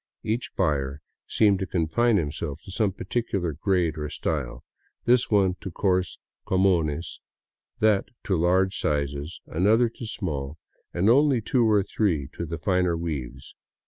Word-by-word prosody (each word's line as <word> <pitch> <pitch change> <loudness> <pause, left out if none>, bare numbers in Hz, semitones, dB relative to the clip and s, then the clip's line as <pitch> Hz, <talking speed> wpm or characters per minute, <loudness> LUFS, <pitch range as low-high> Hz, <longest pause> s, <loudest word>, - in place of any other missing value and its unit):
Each 115 +3 -2
buyer 70 -2 0 0.3
seemed 100 -3 +3
to 95 - -3
confine 95 +8 +2
himself 75 -2 -3
to 95 - -9
some 100 +1 +1
particular 95 -3 -2
grade 85 0 0
or 75 0 -3
style; - - -3 0.4
this 125 0 +3
one 95 -3 +3
to - - -5
coarse 90 -1 0
" - - -61
comunes," 85 -4 +1 0.6
that 105 -2 +3 0.2
to 95 - 0
large 95 +3 +2
sizes, 70 +1 -2
an 90 +5 0
other 115 +2 +4
to 115 0 -8
small, 75 -9 -4 0.3
and 90 +3 0
only 135 +2 +5
two 115 +1 +2
or 105 -2 +4
three 90 -9 0
to 85 - -5
the 85 +1 -4
finer 90 -2 +1
weaves. 75 -7 -5
90 Hz, 150 wpm, -25 LUFS, 80-105 Hz, 0.6 s, only